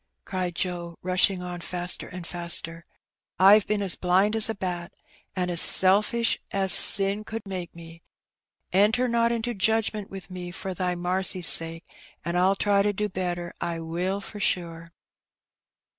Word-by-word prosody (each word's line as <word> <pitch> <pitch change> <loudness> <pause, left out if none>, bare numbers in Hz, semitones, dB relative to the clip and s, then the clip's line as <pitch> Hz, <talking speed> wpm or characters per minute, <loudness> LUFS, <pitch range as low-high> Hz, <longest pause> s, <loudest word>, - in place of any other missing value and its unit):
^' - - -56
cried 180 -2 -5
Joe, 175 -2 -5
rushing 185 0 0
on 175 -1 -8
faster 175 +1 -3
and 180 -1 -10
faster. 170 -1 -4 0.5
^^Pve 195 +2 +5
been 210 -1 -2
as 190 - 0
blind 190 +4 0
as 220 0 +3
a 225 - -3
bat, 175 -2 -6 0.4
an' 180 -1 -3
as 170 - +6
selfish 210 +5 +4
as 195 -1 +3
sin 200 +1 +7
could 220 0 -8
make 185 -4 -8
me. 165 0 -14 0.7
Enter 215 +6 +2
not 235 0 0
into 235 +1 -4
judgment 215 0 -2
with 195 0 -11
me 180 -1 -8
for 190 +1 -7
Thy 180 0 -3
marcy's 180 0 0
sake, 165 0 +3 0.4
an' 170 - -4
Fll 185 +2 +1
try 200 -1 +1
to 205 +1 0
do 210 +1 -4
better 175 -2 -5
— - - -30
I 165 - -6
will, 175 +4 -4
for 210 +1 -10
sure.'' 170 -3 -4
185 Hz, 165 wpm, -24 LUFS, 175-205 Hz, 0.7 s, sin